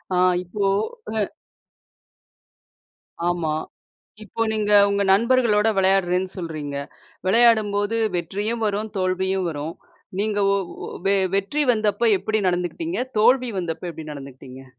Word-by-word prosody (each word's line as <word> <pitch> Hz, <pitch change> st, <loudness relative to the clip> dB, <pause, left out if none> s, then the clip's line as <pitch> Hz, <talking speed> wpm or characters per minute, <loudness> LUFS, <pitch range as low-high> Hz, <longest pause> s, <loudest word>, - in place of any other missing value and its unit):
ஆ -, -, +1 dB, 0.3 s
இப்போ 195 Hz, +3 st, -2 dB, 0.5 s
அ. -, -, +2 dB, 2.1 s
ஆமா. 165 Hz, -3 st, -1 dB, 0.7 s
இப்போ 215 Hz, +3 st, -6 dB
நீங்க 210 Hz, -1 st, 0 dB, 0.2 s
உங்க 200 Hz, 0 st, +1 dB
நண்பர்களோட 230 Hz, -1 st, +3 dB
விளையாடுறேன்னு 190 Hz, -1 st, +2 dB
சொல்கிறீங்க. 155 Hz, -5 st, -5 dB, 0.5 s
விளையாடும்போது 215 Hz, -1 st, +3 dB, 0.2 s
வெற்றியும் 205 Hz, +7 st, -2 dB
வரும், 210 Hz, +1 st, -2 dB
தோல்வியும் 185 Hz, 0 st, 0 dB
வரும். 155 Hz, +1 st, -5 dB, 0.5 s
நீங்க 210 Hz, 0 st, 0 dB
ஒ -, -, +3 dB, 0.3 s
ஒ -, -, -6 dB, 0.2 s
வெ 200 Hz, -, +4 dB, 0.2 s
வெற்றி 200 Hz, +10 st, 0 dB
வந்தப்ப 220 Hz, +1 st, +1 dB
எப்படி 215 Hz, +2 st, -1 dB
நடந்துக்கிட்டீங்க? 180 Hz, -, -2 dB, 0.2 s
தோல்வி 250 Hz, +1 st, +4 dB
வந்தப்ப 170 Hz, 0 st, -4 dB
எப்படி 160 Hz, -1 st, -9 dB
நடந்துக்கிட்டீங்க? 135 Hz, -1 st, -11 dB
200 Hz, 110 wpm, -23 LUFS, 175-220 Hz, 2.1 s, வெ